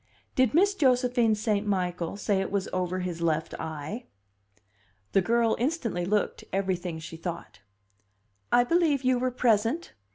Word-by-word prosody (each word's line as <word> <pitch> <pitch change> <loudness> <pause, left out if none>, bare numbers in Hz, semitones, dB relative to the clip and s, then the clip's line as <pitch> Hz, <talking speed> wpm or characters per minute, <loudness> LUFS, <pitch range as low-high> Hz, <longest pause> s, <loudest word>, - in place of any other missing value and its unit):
"Did 260 +1 +2
Miss 400 +4 +5
Josephine 250 - +3
St. 210 -1 -1
Michael 180 -2 -1
say 200 -2 +1
it 195 - -3
was 200 -1 -1
over 185 0 -1
his 175 -2 -4
left 160 -1 0
eye?" 160 - -5 1.0
The 195 - +4
girl 230 +3 +2
instantly 240 - -1
looked 210 +2 0
everything 185 -3 -1
she 160 +1 -8
thought. 170 - -6 0.9
"I 245 - +6
believe 305 -1 +2
you 255 -1 +3
were 255 +1 +1
present!" 235 +5 +1
210 Hz, 140 wpm, -27 LUFS, 180-250 Hz, 1.0 s, I